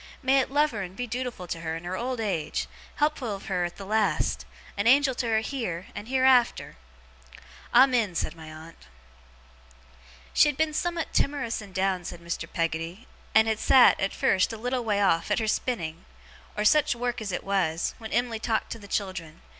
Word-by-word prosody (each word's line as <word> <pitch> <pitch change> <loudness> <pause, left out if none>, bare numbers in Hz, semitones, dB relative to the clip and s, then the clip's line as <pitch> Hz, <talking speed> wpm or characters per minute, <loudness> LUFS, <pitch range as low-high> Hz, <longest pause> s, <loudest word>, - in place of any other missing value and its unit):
May 265 +1 +4
it 260 - 0
love 295 +2 +2
her 215 -4 -4
and 185 -1 -7
be 245 +3 -4
dootiful 240 -5 -4
to 165 - -3
her, 165 -1 -3
in 165 - -10
her 180 +1 -4
old 250 +3 -3
age; 195 -8 -2 0.3
helpful 285 -8 0
of 195 - -11
her 180 -2 0
at 175 - -6
the 195 - -8
last; 215 +1 0 0.3
a 200 +2 0
Angel 270 +2 +5
to 245 -1 -2
her 220 -1 +2
heer, 220 -9 -4
and 210 - -7
heerafter!' 260 - +3 1.0
'Amen!' 245 -8 +4
said 165 - -2
my 160 -1 -10
aunt. 160 - -13 1.5
'She 300 - +5
had 290 - -4
been 315 -1 +1
summat 345 +1 -2
timorous 275 -6 0
and 200 -3 -13
down,' 190 -1 0
said 175 - -7
Mr. 170 0 -5
Peggotty, 165 +6 -3 0.3
'and 220 0 +6
had 220 -1 0
sat, 260 -2 +6
at 195 - 0
first, 190 +3 +2
a 225 - -6
little 245 +2 -2
way 205 -3 0
off, 165 -3 +2
at - - +2
her 220 -2 -1
spinning, 170 -8 -2 0.5
or 210 - 0
such 300 +3 +4
work 245 0 -2
as 205 -3 -4
it 180 - -3
was, 180 -5 0
when 220 -1 -8
Em'ly 240 -2 0
talked 220 0 -1
to 230 - -5
the 200 - -12
children. 185 -6 -4
220 Hz, 195 wpm, -27 LUFS, 180-250 Hz, 1.5 s, and